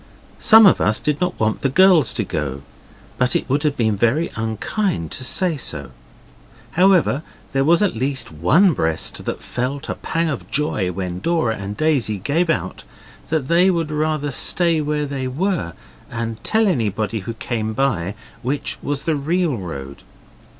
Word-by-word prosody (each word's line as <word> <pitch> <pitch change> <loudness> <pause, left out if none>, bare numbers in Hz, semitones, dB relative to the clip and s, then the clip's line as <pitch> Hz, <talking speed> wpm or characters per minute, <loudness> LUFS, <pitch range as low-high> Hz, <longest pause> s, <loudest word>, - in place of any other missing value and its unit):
Some 220 0 +8
of 195 - +5
us 110 - +2
did 150 +2 -1
not 180 0 -1
want 110 0 0
the 135 - 0
girls 165 - +5
to 110 - 0
go, 70 -7 -4 0.6
but 125 0 +2
it - - 0
would 140 +2 +1
have 145 -2 0
been 110 -4 +1 0.4
unkind 110 - -2
to - - -3
say 165 +5 +1
so. 70 - -4 0.8
However, 180 -5 +3 0.3
there 135 0 +2
was 170 +7 +4
at 200 - 0
least 130 0 -2
one 155 - +4
breast 80 - -1
that - - -4
felt 135 +3 -4
a - - 0
pang 165 0 -2
of 140 -5 -4
joy 110 -11 -1
when 90 -1 -4
Dora 160 - 0
and 100 +1 -6
Daisy 140 -9 +1
gave 155 - 0
out 95 - -2 0.5
that 150 -3 -1
they 175 +4 +4
would 165 -4 -1
rather 155 -1 -1
stay 165 +3 +2
where 150 0 -1
they 135 -2 -3
were 150 - -2 0.4
and 115 -1 -5
tell 220 0 +2
anybody 110 - -1
who 115 +4 -6
came 110 -2 -3
by 105 -7 -1 0.3
which 135 +4 -3
was 145 0 -2
the 160 - 0
real 160 +1 0
road. 70 - -7
135 Hz, 165 wpm, -20 LUFS, 110-165 Hz, 0.8 s, Some